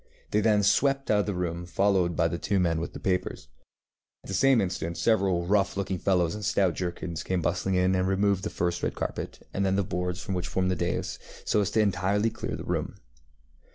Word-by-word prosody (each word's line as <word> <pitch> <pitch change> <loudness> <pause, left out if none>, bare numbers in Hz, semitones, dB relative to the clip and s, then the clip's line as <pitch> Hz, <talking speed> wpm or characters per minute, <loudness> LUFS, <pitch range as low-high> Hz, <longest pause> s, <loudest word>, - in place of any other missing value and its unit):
They 105 - +3
then 105 -1 +3
swept 135 +6 +2
out 105 - +4
of 105 - +1
the 100 - -1
room, 90 -1 -3
followed 90 0 +2
by 80 - +3
the 85 0 -3
two 100 -2 0
men 85 -3 +1
with 85 - -5
the - - -7
papers. 90 -1 -2 0.7
At - - -12
the - - -3
same 135 +5 +4
instant 85 -3 -2
several 95 -6 +2
rough 100 +1 +1
looking 95 -2 -2
fellows 90 -4 +2
in 105 - -6
stout 95 -2 +2
jerkins 85 -2 -4
came 95 -1 -1
bustling 95 +2 0
in 90 +1 +3
and 95 0 +1
removed 95 0 +1
first 85 0 -1
the - - +1
red - - -5
carpet, - - -5
and 100 - 0
then 95 0 +2
the 100 - +2
boards 90 0 -3
which 90 -2 -2
formed 95 -1 0
the - - +1
dais, 85 0 -2 0.3
so 105 - +2
as 100 - 0
to 110 - +2
entirely 100 +2 +1
clear - - -4
the - - -7
room. - - -2
95 Hz, 220 wpm, -27 LUFS, 90-100 Hz, 0.7 s, out